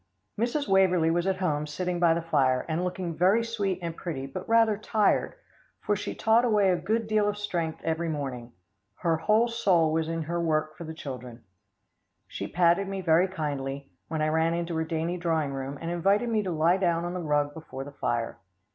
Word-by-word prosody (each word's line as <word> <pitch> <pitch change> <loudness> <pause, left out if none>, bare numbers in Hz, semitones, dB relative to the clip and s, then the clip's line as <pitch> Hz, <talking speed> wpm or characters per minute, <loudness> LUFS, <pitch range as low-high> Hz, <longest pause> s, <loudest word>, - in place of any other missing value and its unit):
Mrs. 245 +6 -1
Waverlee 185 -4 +4
was 175 +2 0
at 190 -1 +1
home 150 -5 -1
sitting 175 +4 -2
by 170 -2 +4
the 170 - -2
fire, 135 -6 +2
and 165 +2 -1
looking 180 -2 -3
very 190 +7 +3
sweet 205 -5 -1
and 165 -1 -4
pretty 150 -7 -5
but 135 - -7
rather 225 -2 +4
tired, 215 0 +1 0.4
for 205 - 0
she - - -4
taught 225 +2 +3
away 210 -5 +3
a - - +3
good 215 +6 -1
deal 215 -1 +2
of 205 - -3
strength 170 -6 -3
every 165 +1 -1
morning. 130 -6 -4 0.4
Her 165 -1 0
whole 215 +8 +3
soul 180 -9 +2
was 160 0 0
in 165 -1 -2
her 170 +2 -2
work 155 -2 0
for 170 - -8
the 160 0 -7
children. 125 -5 -8 0.8
She - - -5
patted 175 +2 +2
me 195 0 -4
very 170 +1 +4
kindly, 140 -5 -4 0.2
when 155 -1 -2
I 155 - +2
ran 160 +1 +2
into 170 0 -3
her 160 - +1
dainty 165 +2 -2
drawing 160 -5 0
room, 135 +1 -5
and 165 0 -4
invited 195 +7 +2
me 220 -2 +1
to 190 -3 -3
lie 165 +3 +3
down 170 -3 +1
on 175 - -3
the 180 - -3
rug 145 -3 0
before 145 -4 -7
the 145 - -9
fire. 120 -4 -2
170 Hz, 205 wpm, -27 LUFS, 155-190 Hz, 0.8 s, Waverlee